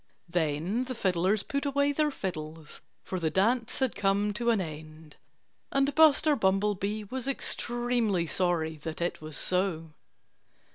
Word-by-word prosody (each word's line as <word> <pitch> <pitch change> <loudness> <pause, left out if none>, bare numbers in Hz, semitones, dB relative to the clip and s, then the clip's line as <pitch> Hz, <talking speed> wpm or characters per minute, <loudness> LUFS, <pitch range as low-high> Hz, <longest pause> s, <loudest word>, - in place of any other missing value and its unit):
Then 170 - 0
the 255 0 -5
fiddlers 190 +1 +1
put 280 0 -2
away 285 0 +2
their 300 +1 +1
fiddles; 160 - -6 0.2
for 185 - -4
the 160 -2 0
dance 230 +7 +1
had 260 -3 +1
come 205 +1 +1
to 235 +3 -1
an 225 -3 +3
end. 155 -2 -8 0.6
And 275 +1 +2
Buster 310 0 +5
Bumblebee 205 0 0
was 260 0 -3
extremely 240 -7 0
sorry 165 -2 0
that 160 +2 -6
it 175 -1 -2
was 155 -2 -7
so. 180 -4 -1
195 Hz, 140 wpm, -29 LUFS, 165-245 Hz, 0.6 s, Buster